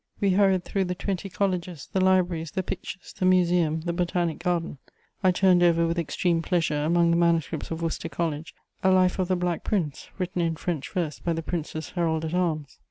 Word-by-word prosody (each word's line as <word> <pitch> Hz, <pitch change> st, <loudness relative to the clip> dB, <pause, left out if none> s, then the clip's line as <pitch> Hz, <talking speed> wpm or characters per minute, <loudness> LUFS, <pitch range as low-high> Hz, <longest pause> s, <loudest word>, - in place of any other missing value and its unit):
We 200 Hz, -1 st, +2 dB
hurried 190 Hz, -1 st, +3 dB
through 195 Hz, -1 st, 0 dB
the 180 Hz, 0 st, -2 dB
twenty 195 Hz, +1 st, -3 dB
colleges, 180 Hz, -5 st, -2 dB
the 190 Hz, -, +2 dB
libraries, 180 Hz, -4 st, +2 dB
the 190 Hz, +2 st, -2 dB
pictures, 185 Hz, 0 st, -6 dB
the -, -, -1 dB
museum, 175 Hz, -3 st, +3 dB
the 170 Hz, +1 st, -2 dB
botanic 175 Hz, -2 st, -1 dB
garden. 175 Hz, -5 st, -1 dB, 0.4 s
I 185 Hz, -, +5 dB
turned 180 Hz, -1 st, +4 dB
over 170 Hz, -1 st, +4 dB
with 165 Hz, +1 st, 0 dB
extreme 170 Hz, +1 st, 0 dB
pleasure, 165 Hz, -4 st, 0 dB
among 170 Hz, +2 st, +3 dB
the 170 Hz, -, +3 dB
manuscripts 170 Hz, -2 st, +1 dB
of 165 Hz, 0 st, -4 dB
Worcester 165 Hz, 0 st, -2 dB
College, 160 Hz, -2 st, -3 dB, 0.3 s
a 190 Hz, -, +3 dB
life 185 Hz, 0 st, +3 dB
of 185 Hz, -, +1 dB
the 185 Hz, -, +2 dB
Black 175 Hz, -1 st, -1 dB
Prince, 170 Hz, -9 st, -2 dB
written 180 Hz, -2 st, -2 dB
in 165 Hz, -1 st, 0 dB
French 160 Hz, -3 st, -3 dB
verse 165 Hz, -5 st, -2 dB
by 170 Hz, -, -1 dB
the 165 Hz, 0 st, -3 dB
Prince's 160 Hz, -2 st, -4 dB
herald 160 Hz, -2 st, 0 dB
at 160 Hz, -, -4 dB
arms. 160 Hz, -6 st, -1 dB
175 Hz, 200 wpm, -26 LUFS, 165-185 Hz, 0.4 s, I